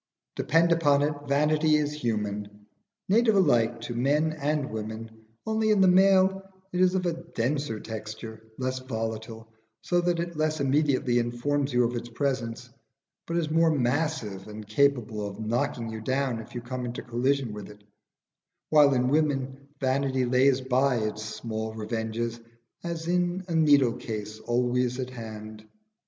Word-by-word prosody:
Depend 165 +2 +3
upon 145 -4 +4
it, 150 +1 +1
vanity 150 +2 +3
is 150 -1 0
human, 105 -5 -3 0.4
native 220 +2 +4
alike 120 - +3
to 120 +1 -5
men 145 +6 +1
and 150 -3 -1
women; 110 +1 -5 0.3
only 220 0 +1
in 210 -2 +4
the 190 - +6
male 190 +1 +5 0.3
it 180 - +1
is 185 0 +4
of 170 -2 -3
denser 130 -1 -1
texture, 110 0 -7 0.2
less 130 0 -2
volatile, 110 -2 -5 0.4
so 175 0 +2
that 175 -1 0
it 170 0 -3
less 155 0 0
immediately 135 -3 +2
informs 135 +4 -1
you 125 0 +3
of 120 +1 -1
its 120 0 -5
presence, 120 -2 -2 0.6
but 170 - -1
is 160 -3 -1
more 165 +1 +4
massive 130 -8 -1
and 105 0 -8
capable 115 -3 +1
of 100 +1 -8
knocking 115 +1 -1
you 110 0 -6
down 130 0 -1
if 110 +2 -11
you 120 - -3
come 125 +1 -5
into 120 0 -5
collision 125 0 0
with 105 -2 -8
it; 105 0 -15 0.9
while 145 -3 +6
in 125 0 +2
women 140 -2 0
vanity 130 -1 +1
lays 130 +2 +3
by 130 +1 +2
its 110 -2 -2
small 110 0 -5
revenges 110 +1 -3 0.4
as 170 -1 -4
in 180 +1 0
a 170 - -3
needle 145 -6 +5
case 110 -2 -6
always 125 +2 0
at 130 0 -4
hand. 110 -2 -8
130 Hz, 155 wpm, -27 LUFS, 115-155 Hz, 0.9 s, the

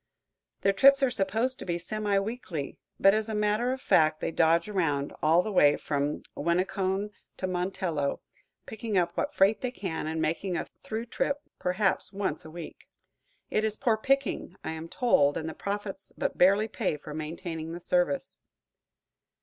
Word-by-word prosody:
Their 195 - +3
trips 275 +5 +6
are 260 - +3
supposed 225 +4 0
to - - -6
be 170 -2 -1
semi 205 +3 -1
weekly, 195 - -4 0.2
but 195 - +6
as 215 +1 0
a 220 - -2
matter 210 +4 +1
of 260 - -3
fact 155 -8 +3
they - - -2
dodge 165 +2 +3
around, 155 -9 0
all 165 +3 +4
the 215 - -3
way 145 -7 +5
from 145 0 -2
Winneconne 190 +4 0 0.3
to - - -2
Montello, 180 -5 -1 0.5
picking 220 -2 -3
up 175 -1 +1
what 290 - -2
freight 195 +3 +4
they 255 - -1
can 185 -10 -4
and 160 +1 -2
making 175 +3 -1
a - - -2 0.2
through 225 +1 -4
trip 280 +4 -1 0.2
perhaps 190 +2 0
once 195 -6 -2
a 160 - -10
week. 170 0 -9 0.6
It 215 - +1
is 215 -1 0
poor 235 -5 +2
picking, 270 -4 0
I - - -3
am 160 +1 -6
told, 145 - +3
and 160 - -4
the 160 - -4
profits 200 +1 -5
but - - -1
barely 200 +4 +4
pay 200 -8 -2
for 150 +1 -9
maintaining 160 +1 -5
the 170 - -5
service. 180 +10 0
190 Hz, 175 wpm, -28 LUFS, 160-215 Hz, 0.6 s, trips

